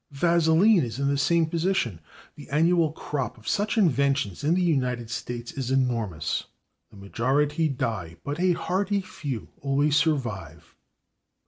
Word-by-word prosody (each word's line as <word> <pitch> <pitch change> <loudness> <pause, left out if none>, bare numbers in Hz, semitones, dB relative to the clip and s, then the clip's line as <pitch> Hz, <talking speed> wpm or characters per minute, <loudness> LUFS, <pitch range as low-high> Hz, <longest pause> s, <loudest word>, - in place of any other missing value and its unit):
/Vaseline/ 170 +6 +4
is 120 +1 -5
in 140 0 +1
the 140 - +1
same 165 +4 +2
position. 160 - -1 0.3
The - - -13
annual 165 +2 +3
crop 140 -5 -4
of 110 - -16
such 210 +3 0
inventions 140 - +1
in 155 +4 +2
the 185 - +1
United 125 -8 0
States 120 0 -5
is 130 -3 -4
enormous. 115 - -1 0.4
The - - -16
majority 145 +10 0
die, 110 - -3
but 145 +3 -4
a 180 0 +3
hearty 195 +4 -1
few 145 - -6
always 140 +2 +1
survive. 105 - -1
140 Hz, 140 wpm, -26 LUFS, 120-165 Hz, 0.4 s, Vaseline